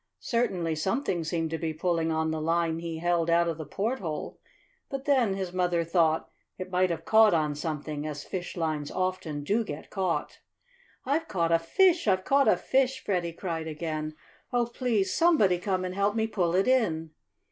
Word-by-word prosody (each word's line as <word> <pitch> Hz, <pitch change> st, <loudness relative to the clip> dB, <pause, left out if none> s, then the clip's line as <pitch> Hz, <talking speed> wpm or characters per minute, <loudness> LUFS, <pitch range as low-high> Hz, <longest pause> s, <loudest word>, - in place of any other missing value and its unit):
Certainly 180 Hz, -9 st, -1 dB
something 190 Hz, -, -1 dB
seemed 160 Hz, 0 st, -2 dB
to 165 Hz, -, -2 dB
be 160 Hz, -2 st, -3 dB
pulling 165 Hz, -1 st, 0 dB
on 160 Hz, 0 st, 0 dB
the 160 Hz, -1 st, -2 dB
line 165 Hz, 0 st, +1 dB
he 165 Hz, -1 st, -5 dB
held 170 Hz, 0 st, +1 dB
out 170 Hz, 0 st, +4 dB
of 165 Hz, -1 st, -3 dB
the 155 Hz, -, -6 dB
porthole, 195 Hz, -, -3 dB, 0.5 s
but 275 Hz, -1 st, -5 dB
then, 250 Hz, -9 st, +3 dB
his 190 Hz, -2 st, -4 dB
mother 175 Hz, -2 st, +1 dB
thought, 165 Hz, -1 st, +2 dB, 0.3 s
it 185 Hz, 0 st, -7 dB
might 185 Hz, 0 st, +2 dB
have 170 Hz, -, -4 dB
caught 220 Hz, -4 st, +6 dB
on 155 Hz, -2 st, +1 dB
something, 150 Hz, 0 st, -4 dB
as 150 Hz, -1 st, -5 dB
fishlines 160 Hz, -5 st, -3 dB
often 185 Hz, -5 st, -2 dB
do 210 Hz, +9 st, +1 dB
get 150 Hz, -8 st, -8 dB
caught. 180 Hz, -6 st, -2 dB, 0.7 s
"I've 305 Hz, +5 st, 0 dB
caught 170 Hz, -, 0 dB
a 165 Hz, -, +5 dB
fish! 350 Hz, -, +3 dB
I've 185 Hz, -1 st, +2 dB
caught 275 Hz, -2 st, +4 dB
a -, -, +5 dB
fish!" 265 Hz, 0 st, +1 dB
Freddie 175 Hz, -4 st, -1 dB
cried 165 Hz, -2 st, -4 dB
again. 155 Hz, -1 st, -4 dB, 0.4 s
"Oh, 245 Hz, -1 st, +2 dB
please 230 Hz, -5 st, 0 dB
somebody 260 Hz, -, +4 dB
come 185 Hz, -1 st, -1 dB
and 180 Hz, -, -4 dB
help 200 Hz, +2 st, +1 dB
me 220 Hz, -1 st, +1 dB
pull 180 Hz, -6 st, 0 dB
it 190 Hz, +4 st, +2 dB
in!" 170 Hz, -12 st, +1 dB
175 Hz, 180 wpm, -28 LUFS, 160-210 Hz, 0.7 s, caught